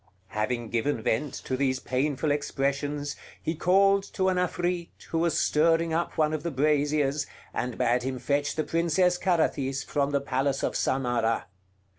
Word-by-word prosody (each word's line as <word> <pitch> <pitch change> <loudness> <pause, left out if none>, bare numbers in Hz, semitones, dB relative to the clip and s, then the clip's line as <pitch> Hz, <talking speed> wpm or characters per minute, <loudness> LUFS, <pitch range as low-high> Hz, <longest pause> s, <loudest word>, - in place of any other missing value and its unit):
Having 115 +2 -2
given 115 0 0
vent 130 +6 0
to 130 - -3
these 130 -1 +1
painful 140 +4 0
expressions, 145 0 -1 0.2
he 160 - -2
called 195 +4 +4
to 190 -1 +2
an 185 - 0
Afrit, 175 -1 -1 0.2
who 165 - +1
was 170 0 +2
stirring 165 +1 +3
up 170 +1 -1
one 155 0 +2
of 155 - -2
the 170 - -2
braziers, 145 0 +1 0.3
and 125 0 -3
bade 125 0 +2
him 130 +1 -3
fetch 145 +3 0
the 155 - 0
Princess 175 +2 +2
Carathis 140 -7 +1
from 140 -1 0
the 140 -1 +1
palace 135 0 -1
of - - 0
Samarah. 120 -3 0
145 Hz, 160 wpm, -27 LUFS, 130-165 Hz, 0.3 s, called